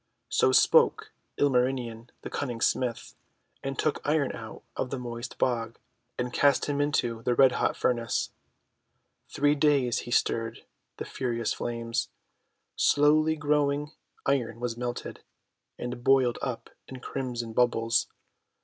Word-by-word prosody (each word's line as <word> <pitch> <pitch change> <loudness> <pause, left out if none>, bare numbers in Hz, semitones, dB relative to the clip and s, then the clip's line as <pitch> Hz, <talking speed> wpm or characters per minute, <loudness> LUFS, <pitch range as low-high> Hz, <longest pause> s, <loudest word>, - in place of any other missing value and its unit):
So - - +3
spoke - - +4 0.3
Ilmarinen 125 -4 0
the - - -7
Cunning 120 -5 -3
Smith, 120 0 -1 0.5
and 135 0 -4
took 155 - 0
Iron 145 -2 +1
out 110 -1 -9
of 130 - -2
the 135 - -3
moist 120 -1 -6
bog, 115 -3 -1 0.4
and 125 0 -3
cast 140 -2 +3
him 145 -1 -1
into 120 -6 0
the 120 +1 0
red 135 0 +6
hot - - 0
furnace. 120 -2 0 1.0
Three 145 +1 +2
days 140 -5 +2
he - - -8
stirred 115 -1 0 0.3
the - - -5
furious 120 -3 -2
flames. 115 -1 -3 0.7
Slowly 155 +2 +4
glowing 145 -1 0 0.3
Iron 120 -5 0
was 120 -1 -2
melted, 120 0 -5 0.6
and 120 0 -5
boiled 130 -2 +3
up 125 -3 -4 0.2
in 130 - -9
crimson 120 -3 -4
bubbles. 120 -1 +2
125 Hz, 130 wpm, -28 LUFS, 115-140 Hz, 1.0 s, red